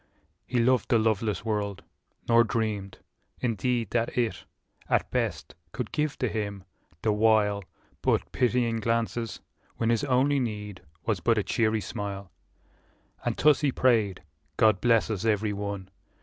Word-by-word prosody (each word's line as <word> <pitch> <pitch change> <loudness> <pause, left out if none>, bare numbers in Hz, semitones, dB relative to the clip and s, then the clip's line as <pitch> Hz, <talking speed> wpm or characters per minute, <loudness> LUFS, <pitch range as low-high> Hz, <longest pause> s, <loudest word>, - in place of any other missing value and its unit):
He 125 - -1
loved 125 +1 +2
the 120 - +5
loveless 110 -1 0
world, 105 -3 -2 0.4
nor 115 0 +6
dreamed, 105 -4 -2 0.4
in 120 -2 0
deed. 120 0 -1
That 120 0 -1
it, 120 -2 -1 0.4
at - - +1
best, - - -2 0.2
could - - -4
give 150 -1 -1
to 130 - 0
him, 100 -3 -3 0.4
the 110 - +3
while. 105 -2 +3 0.4
But - - +1
pitying 120 -2 +1
glances, 115 +1 -1 0.4
when 115 0 +1
his 115 - +1
only 135 +2 +3
need 105 -5 -4 0.2
Was 110 -5 0
but 115 +6 +2
a 105 - +2
cheery 110 0 +1
smile. 100 -1 -5 0.9
And - - -1
thus 150 0 +4
he 145 -2 +2
prayed, 110 -9 +2 0.2
" 70 0 -42
God 110 -4 +4
bless 115 -2 +3
us 100 -4 -3
every 105 -1 +1
one!" 100 -1 -4
110 Hz, 150 wpm, -27 LUFS, 100-120 Hz, 0.9 s, nor